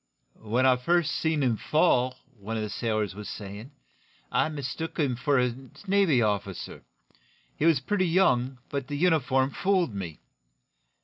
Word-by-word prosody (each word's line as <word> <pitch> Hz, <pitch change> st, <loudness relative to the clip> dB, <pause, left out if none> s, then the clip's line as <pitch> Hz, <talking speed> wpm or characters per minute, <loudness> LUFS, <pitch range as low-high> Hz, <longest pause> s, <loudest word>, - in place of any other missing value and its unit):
"When 115 Hz, +4 st, +1 dB
I 130 Hz, -1 st, +5 dB
first 170 Hz, +5 st, +1 dB
seen 160 Hz, -3 st, 0 dB
him 120 Hz, -4 st, +1 dB
fall," 130 Hz, -5 st, +2 dB, 0.2 s
one 110 Hz, +3 st, -4 dB
of 110 Hz, -, -2 dB
the 105 Hz, -, -4 dB
sailors 110 Hz, -3 st, -1 dB
was 105 Hz, +1 st, -8 dB
saying, 105 Hz, +4 st, -8 dB, 0.6 s
"I -, -, +2 dB
mistook 155 Hz, +2 st, -5 dB
him 140 Hz, -6 st, +1 dB
for 140 Hz, +2 st, +1 dB
a 125 Hz, -1 st, +1 dB, 0.3 s
Navy 190 Hz, -, +3 dB
officer. 105 Hz, -3 st, -3 dB, 0.7 s
He 155 Hz, -, -1 dB
was 160 Hz, -5 st, +4 dB
pretty 185 Hz, +7 st, 0 dB
young, 135 Hz, -8 st, +2 dB
but 140 Hz, -2 st, -3 dB
the 145 Hz, 0 st, -4 dB
uniform 140 Hz, -5 st, +2 dB
fooled 185 Hz, -, +1 dB
me." 90 Hz, -6 st, -6 dB
130 Hz, 150 wpm, -27 LUFS, 115-160 Hz, 0.7 s, I